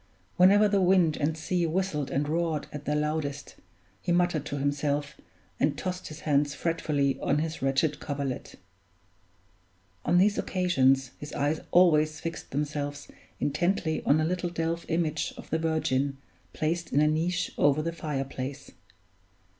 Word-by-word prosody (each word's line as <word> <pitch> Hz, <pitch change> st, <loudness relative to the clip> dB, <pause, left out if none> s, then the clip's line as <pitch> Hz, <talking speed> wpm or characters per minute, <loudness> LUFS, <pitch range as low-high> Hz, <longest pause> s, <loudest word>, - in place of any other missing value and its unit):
Whenever 200 Hz, +4 st, +6 dB
the 200 Hz, -1 st, +2 dB
wind 180 Hz, -4 st, +4 dB
and 155 Hz, +2 st, -1 dB
sea 175 Hz, +1 st, 0 dB
whistled 160 Hz, -4 st, -1 dB
and 145 Hz, +2 st, -1 dB
roared 160 Hz, -1 st, -1 dB
at 145 Hz, -1 st, -7 dB
their 150 Hz, -, 0 dB
loudest, 150 Hz, -1 st, -2 dB, 0.4 s
he -, -, -2 dB
muttered 175 Hz, -4 st, +1 dB
to 145 Hz, -, -3 dB
himself 145 Hz, +1 st, -1 dB, 0.4 s
and -, -, +1 dB
tossed 185 Hz, 0 st, -4 dB
his 155 Hz, 0 st, -9 dB
hands 145 Hz, -1 st, +1 dB
fretfully 150 Hz, -5 st, 0 dB
on -, -, +1 dB
his 160 Hz, +1 st, -3 dB
wretched 135 Hz, +3 st, +1 dB
coverlet. 140 Hz, -3 st, -4 dB, 1.5 s
On 175 Hz, -, +3 dB
these 200 Hz, +3 st, +4 dB
occasions 135 Hz, -8 st, +2 dB
his 145 Hz, +1 st, -8 dB
eyes 145 Hz, +2 st, 0 dB
always 155 Hz, -4 st, +4 dB
fixed 165 Hz, 0 st, -6 dB
themselves 145 Hz, 0 st, -3 dB, 0.3 s
intently 160 Hz, +2 st, 0 dB
on 145 Hz, -, +4 dB
a 155 Hz, -, +1 dB
little 175 Hz, +1 st, -1 dB
delf 165 Hz, 0 st, -2 dB
image 160 Hz, -2 st, -1 dB
of -, -, -11 dB
the 160 Hz, -, +1 dB
Virgin 140 Hz, -4 st, 0 dB, 0.3 s
placed 165 Hz, +2 st, -2 dB
in 145 Hz, -, +3 dB
a 150 Hz, -, +4 dB
niche 170 Hz, +3 st, 0 dB
over 145 Hz, +1 st, +3 dB
the 165 Hz, +1 st, -2 dB
fire 150 Hz, -4 st, -3 dB
place. 135 Hz, +1 st, -6 dB
155 Hz, 150 wpm, -28 LUFS, 145-170 Hz, 1.5 s, Whenever